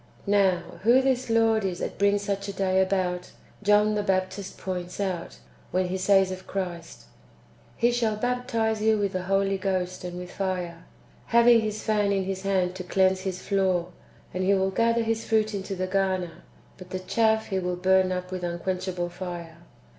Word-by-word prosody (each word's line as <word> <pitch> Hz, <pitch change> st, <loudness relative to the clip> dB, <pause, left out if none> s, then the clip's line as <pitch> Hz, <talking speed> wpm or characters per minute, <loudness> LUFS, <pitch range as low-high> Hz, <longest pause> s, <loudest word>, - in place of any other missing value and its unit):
"^ -, -, -31 dB, 0.2 s
Now, 200 Hz, -3 st, +3 dB, 0.2 s
who 235 Hz, +5 st, +5 dB
this 260 Hz, -2 st, 0 dB
Lord 225 Hz, -1 st, +3 dB
is 185 Hz, -2 st, -2 dB
that -, -, -5 dB
brings 200 Hz, 0 st, +3 dB
such 200 Hz, 0 st, -2 dB
a 200 Hz, -, -4 dB
day 190 Hz, -1 st, +2 dB
about, 185 Hz, -2 st, -1 dB, 0.3 s
John 210 Hz, +1 st, +4 dB
the 210 Hz, -, 0 dB
Baptist 190 Hz, 0 st, -2 dB
points 180 Hz, -1 st, -5 dB
out, 180 Hz, -, -3 dB, 0.3 s
when 185 Hz, 0 st, 0 dB
he 185 Hz, -, -1 dB
says 190 Hz, 0 st, +4 dB
of 185 Hz, 0 st, -7 dB
Christ, 175 Hz, -4 st, -5 dB, 0.4 s
" -, -, -29 dB, 0.3 s
He 240 Hz, +1 st, +3 dB
shall 230 Hz, -3 st, +1 dB
baptize 230 Hz, -2 st, -1 dB
you 220 Hz, 0 st, +3 dB
with 200 Hz, -2 st, -1 dB
the 185 Hz, -, -1 dB
Holy 195 Hz, +1 st, +1 dB
Ghost 185 Hz, -2 st, -2 dB
and 175 Hz, 0 st, -5 dB
with 180 Hz, 0 st, -7 dB
fire, 180 Hz, -3 st, -3 dB, 0.4 s
having 235 Hz, 0 st, +6 dB
His 215 Hz, -1 st, -3 dB
fan 210 Hz, -2 st, +1 dB
in 195 Hz, -1 st, +1 dB
His 190 Hz, 0 st, -3 dB
hand 190 Hz, -2 st, +1 dB
to 185 Hz, -, -5 dB
cleanse 190 Hz, +1 st, +2 dB
His 185 Hz, -1 st, -4 dB
floor; 185 Hz, -3 st, +1 dB, 0.4 s
and 185 Hz, +1 st, -1 dB
He 195 Hz, +1 st, +4 dB
will 190 Hz, 0 st, +1 dB
gather 230 Hz, +3 st, +2 dB
His 225 Hz, 0 st, -1 dB
fruit 220 Hz, -1 st, +1 dB
into 195 Hz, -1 st, -4 dB
the 185 Hz, 0 st, -2 dB
garner, 185 Hz, -3 st, -1 dB, 0.4 s
but 185 Hz, -1 st, -11 dB
the 185 Hz, -, -3 dB
chaff 220 Hz, +3 st, +1 dB
He 190 Hz, -, -1 dB
Avill 180 Hz, -1 st, -3 dB
burn 190 Hz, 0 st, +3 dB
up 180 Hz, 0 st, -4 dB
with 185 Hz, -1 st, -4 dB
un 170 Hz, 0 st, -2 dB
quenchable 180 Hz, -1 st, -3 dB
fire." 175 Hz, -2 st, -7 dB
190 Hz, 190 wpm, -26 LUFS, 185-210 Hz, 0.4 s, having